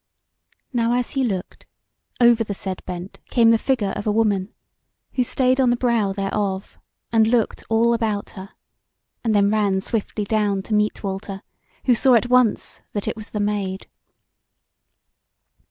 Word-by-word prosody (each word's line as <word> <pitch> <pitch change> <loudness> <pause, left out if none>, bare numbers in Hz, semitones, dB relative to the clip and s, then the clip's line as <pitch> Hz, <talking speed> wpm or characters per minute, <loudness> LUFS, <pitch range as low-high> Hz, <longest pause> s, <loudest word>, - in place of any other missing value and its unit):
Now 235 -1 +1
as 245 0 0
he 270 - 0
looked, 195 -7 -4 0.5
over 235 -1 +5
the 205 -2 -5
said 190 -1 -5
bent 180 +1 -7
came 230 -2 +5
the 225 - +4
figure 230 -7 0
of 205 - -5
a - - +3
woman, 205 -2 +1 0.6
who 255 - +2
stayed 255 +2 +2
on 255 - +4
the 240 - +3
brow 235 -5 +1
thereof 195 0 -3 0.3
and 220 -1 +4
looked 230 -2 0
all 230 +1 +3
about 220 -3 -1
her, 190 0 -9 0.7
and 225 -3 +1
then 200 0 +4
ran 205 -3 +1
swiftly 210 +1 -2
down 205 -2 0
to 215 - -4
meet 210 +1 +1
Walter, 195 0 -5 0.4
who 250 - +5
saw 255 +2 +4
at 240 +1 +2
once 250 -4 +2
that 205 - -3
it - - -1
was 215 -1 -8
the 210 - -4
Maid. 205 -2 -2
215 Hz, 160 wpm, -22 LUFS, 200-235 Hz, 0.7 s, over